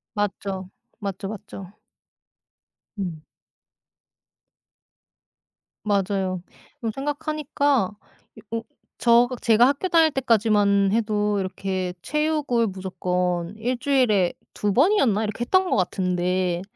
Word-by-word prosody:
맞죠. 195 Hz, -2 st, -3 dB, 0.3 s
맞죠, 195 Hz, -1 st, -4 dB
맞죠. 195 Hz, -2 st, -9 dB, 1.3 s
음. 165 Hz, -5 st, -4 dB, 2.6 s
맞아요. 195 Hz, -3 st, 0 dB, 0.4 s
그리고 230 Hz, -4 st, -2 dB
생각하니까 285 Hz, -, 0 dB, 0.6 s
여 -, -, +1 dB
오 225 Hz, -, -5 dB, 0.4 s
저가 240 Hz, +1 st, +4 dB
제가 230 Hz, +2 st, +5 dB
학교 285 Hz, +7 st, 0 dB
다닐 325 Hz, -2 st, +5 dB
때까지만 210 Hz, -6 st, +3 dB
해도 210 Hz, -2 st, +1 dB
이렇게 185 Hz, -1 st, -3 dB
체육을 300 Hz, -6 st, +1 dB
무조건 180 Hz, -1 st, -2 dB
1 245 Hz, +3 st, -1 dB
주일에 245 Hz, -9 st, +2 dB, 0.2 s
2 205 Hz, -1 st, -1 dB
번이었나? 260 Hz, -, +3 dB
이렇게 215 Hz, +2 st, -4 dB
했던 370 Hz, +9 st, +2 dB
것 -, -, +2 dB
같은데 180 Hz, -1 st, 0 dB
210 Hz, 210 characters per minute, -24 LUFS, 190-255 Hz, 2.6 s, 제가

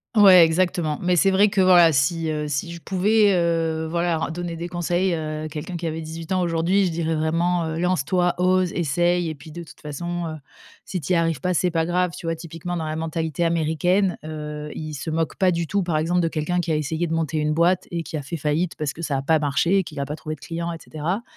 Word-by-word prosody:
Ouais, 190 Hz, -4 st, +8 dB
exactement, 160 Hz, -2 st, 0 dB
Mais 180 Hz, 0 st, +2 dB
c'est 195 Hz, +3 st, +4 dB
vrai 200 Hz, +2 st, +4 dB
que 195 Hz, -1 st, -1 dB
voilà, 175 Hz, -3 st, +7 dB
si, 160 Hz, +4 st, +1 dB
heu, 150 Hz, -1 st, -2 dB
si 145 Hz, +4 st, -2 dB
je 170 Hz, -, -8 dB
pouvais, 200 Hz, +3 st, +3 dB
heu, 165 Hz, -2 st, 0 dB
voilà, 170 Hz, -1 st, 0 dB
ren -, -, -2 dB
donner 170 Hz, 0 st, -4 dB
des 170 Hz, +1 st, -5 dB
conseils, 175 Hz, +1 st, 0 dB
heu, 155 Hz, 0 st, -4 dB
quelqu'un 155 Hz, +3 st, -6 dB
qui 170 Hz, 0 st, -3 dB
avait 160 Hz, +1 st, -3 dB
18 160 Hz, +2 st, -8 dB
ans 185 Hz, -1 st, +2 dB
aujourd'hui, 175 Hz, +4 st, +2 dB
je 175 Hz, -, 0 dB
dirais 165 Hz, -1 st, -1 dB
vraiment, 165 Hz, +2 st, +1 dB
heu: 160 Hz, +1 st, -3 dB
«Lance 180 Hz, -6 st, +1 dB
toi, 180 Hz, 0 st, +1 dB
ose, 185 Hz, 0 st, +2 dB
essaye 175 Hz, +2 st, +1 dB
et -, -, -4 dB
puis 155 Hz, +2 st, -13 dB
de 170 Hz, +2 st, -7 dB
toute -, -, -16 dB
façon, 170 Hz, +3 st, -4 dB
heu, 155 Hz, -, -5 dB, 0.5 s
si 180 Hz, -3 st, -4 dB
tu 180 Hz, +6 st, -1 dB
y -, -, +4 dB
arrives 165 Hz, -5 st, 0 dB
pas, 180 Hz, -1 st, 0 dB
c'est 180 Hz, 0 st, +1 dB
pas 165 Hz, 0 st, 0 dB
grave». 180 Hz, 0 st, +1 dB
Tu 165 Hz, -, -7 dB
vois? 165 Hz, -, 0 dB
Typiquement 165 Hz, +2 st, -6 dB
dans 160 Hz, -, -3 dB
la 155 Hz, 0 st, -3 dB
mentalité 160 Hz, 0 st, -2 dB
américaine, 170 Hz, +4 st, +1 dB
heu, 150 Hz, -1 st, -6 dB
ils 155 Hz, -1 st, -5 dB
se 150 Hz, +3 st, -5 dB
moquent 160 Hz, 0 st, -1 dB
pas 190 Hz, -1 st, +3 dB
du 170 Hz, -1 st, 0 dB
tout, 200 Hz, +5 st, 0 dB
par 170 Hz, -3 st, -1 dB
exemple, 175 Hz, +3 st, +1 dB
de 165 Hz, -, +1 dB
quelqu'un 165 Hz, +3 st, -1 dB
qui 170 Hz, -2 st, -1 dB
a -, -, +2 dB
essayé 160 Hz, +3 st, -1 dB
de 160 Hz, -, -3 dB
monter 160 Hz, -1 st, -1 dB
une 150 Hz, 0 st, 0 dB
boîte 175 Hz, +2 st, +2 dB
et 170 Hz, -1 st, -3 dB
qui 160 Hz, -, -7 dB
a 150 Hz, -, -2 dB
fait 160 Hz, +5 st, -5 dB
faillite 155 Hz, +4 st, -1 dB
parce 150 Hz, -3 st, -2 dB
que 165 Hz, -, -9 dB
ça 140 Hz, -4 st, -1 dB
a 135 Hz, -, -3 dB
pas 160 Hz, +1 st, +3 dB
marché 160 Hz, +6 st, +2 dB
et -, -, 0 dB
qu'il 155 Hz, -4 st, -8 dB
a 140 Hz, -, -1 dB
pas 150 Hz, -, -5 dB
trouvé 155 Hz, -1 st, -6 dB
de -, -, -25 dB
clients 170 Hz, 0 st, -4 dB
et 165 Hz, -, -5 dB
cetera. 170 Hz, +9 st, -3 dB
165 Hz, 260 wpm, -23 LUFS, 155-175 Hz, 0.5 s, Ouais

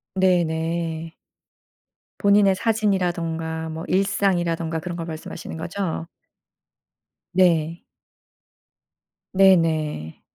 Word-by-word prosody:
네네. 165 Hz, -2 st, 0 dB, 1.1 s
본인의 200 Hz, -2 st, +5 dB
사진이라든가 170 Hz, -7 st, -1 dB
뭐 160 Hz, +1 st, -5 dB
일상이라든가 175 Hz, -4 st, +1 dB
그런 175 Hz, +2 st, -5 dB
걸 165 Hz, -, -4 dB
말씀하시는 160 Hz, 0 st, -7 dB
거죠? 165 Hz, 0 st, -3 dB, 1.3 s
네. 170 Hz, -3 st, +3 dB, 1.5 s
네네. 160 Hz, -, +2 dB
170 Hz, 180 characters per minute, -23 LUFS, 160-190 Hz, 1.5 s, 본인의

